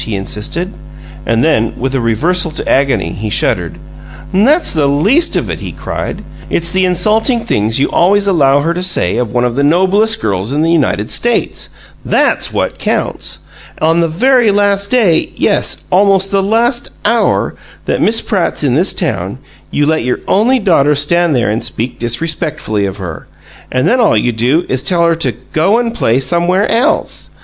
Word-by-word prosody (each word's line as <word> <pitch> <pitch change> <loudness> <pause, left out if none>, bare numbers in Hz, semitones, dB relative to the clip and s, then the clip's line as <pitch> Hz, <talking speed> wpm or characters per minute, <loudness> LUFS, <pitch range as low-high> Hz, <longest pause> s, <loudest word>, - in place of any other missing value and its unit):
he 110 - -4
insisted, 105 - -3 0.5
and 115 0 +1
then, 130 -8 +1
with 130 +1 -2
a 135 - 0
reversal 165 +11 +1
to 155 - -4
agony, 135 -11 +1
he 105 +3 -5
shuddered. - - 0 0.6
"That's 275 - +3
the 150 -4 +1
least 200 - +2
of - - -1
it!" - - -4
he - - -6
cried. - - -6 0.3
"It's 170 0 0
the 185 +1 +1
insulting 215 +7 +1
things 110 - 0
you 140 - +2
always 200 +3 +2
allow 145 -7 +3
her 165 +3 0
to 180 - -4
say 115 - 0
of 120 -3 -2
one 125 0 0
of 120 - -1
the 140 - 0
noblest 190 +8 +2
girls 100 - -2
in 150 +2 0
the 165 - +1
United 135 -10 0
States 240 0 0 0.3
THAT'S - - +1
what - - -3
counts! - - -2 0.4
On 165 +2 +2
the 170 - +2
very 240 +7 +2
last 200 0 +1
day 210 -11 +2
yes, - - 0
almost 195 +1 +3
the 195 -1 +2
last 235 +5 0 0.2
hour 230 +2 +1 0.3
that - - -1
Miss 225 +1 +3
Pratt's 190 -7 -1
in 135 -4 +1
this 175 +8 +2
town, 100 - -3 0.3
you 145 - 0
let 155 -2 0
your 125 +1 -2
only 235 +6 +2
daughter 160 - +2
stand 165 +2 +1
there 120 -4 +1
and 110 - -2
speak 120 +3 -3
disrespectfully 120 - -2
of 95 +1 -6
her 90 -5 -8 0.4
and 130 +1 0
then 255 - +2
all 220 - +3
you 120 +3 +1
do 125 +9 0
is 130 0 -1
tell 170 +1 +1
her 170 - +3
to 160 -6 -1 0.2
'go 190 +8 +2
and 235 -1 -1
play 120 - +1
somewhere 175 +7 +1
else'! 255 +7 0
165 Hz, 180 wpm, -13 LUFS, 125-200 Hz, 0.6 s, That's